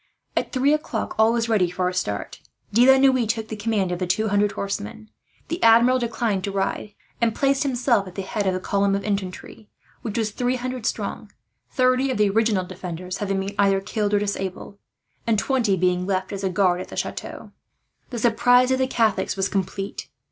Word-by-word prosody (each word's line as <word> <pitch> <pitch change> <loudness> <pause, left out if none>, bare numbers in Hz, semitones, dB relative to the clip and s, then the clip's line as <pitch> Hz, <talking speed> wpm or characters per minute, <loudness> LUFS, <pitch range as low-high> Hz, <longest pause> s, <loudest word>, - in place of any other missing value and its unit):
At - - -1
three 275 +2 +2
o'clock 300 -7 -2
all 220 +1 +5
was 230 0 0
ready 205 -6 +2
for 180 +1 -1
a 180 - -2
start. 105 - -3 0.3
De 240 +4 +5
la 265 - +8
Noue 260 -3 +3
took 220 0 -2
the 220 - -4
command 205 -3 -1
of 175 - -3
the 185 - -2
two 215 +5 +1
hundred 205 0 +2
horsemen. 110 - -5 0.4
The 335 +3 -4
Admiral 235 +3 +6
declined 230 -5 -1
to 200 - -3
ride, 195 +1 -3 0.3
and 230 -1 +2
placed 275 -1 +2
himself 245 -6 +1
at 185 - -11
the 195 - -3
head 205 0 -2
of 185 - +1
the - - -2
column 200 +1 +1
of 200 - -3
infantry, 200 +1 -5 0.3
which 225 -1 -4
was 220 -2 0
three 245 +4 -1
hundred 255 -2 -4
strong; - - -4 0.4
thirty 255 0 +2
of 260 - -1
the 210 -1 +3
original 215 -3 +1
defenders 180 0 -6
having 195 -1 -1
been 195 +1 -4
either 195 -1 +4
killed 210 +1 -1
or - - +3
disabled, 200 -1 -4 0.5
and 225 -2 +3
twenty 230 -4 +1
being 180 0 +1
left 190 0 -1
as 200 0 -5
a 190 - +1
guard 180 -1 +2
at - - -7
the - - -10
chateau. - - -5 0.6
The 245 - -5
surprise 245 +2 +4
of 260 - +2
the 260 - +2
Catholics 225 -5 +1
was 195 0 0
complete. 195 0 -3
210 Hz, 205 wpm, -23 LUFS, 190-240 Hz, 0.6 s, la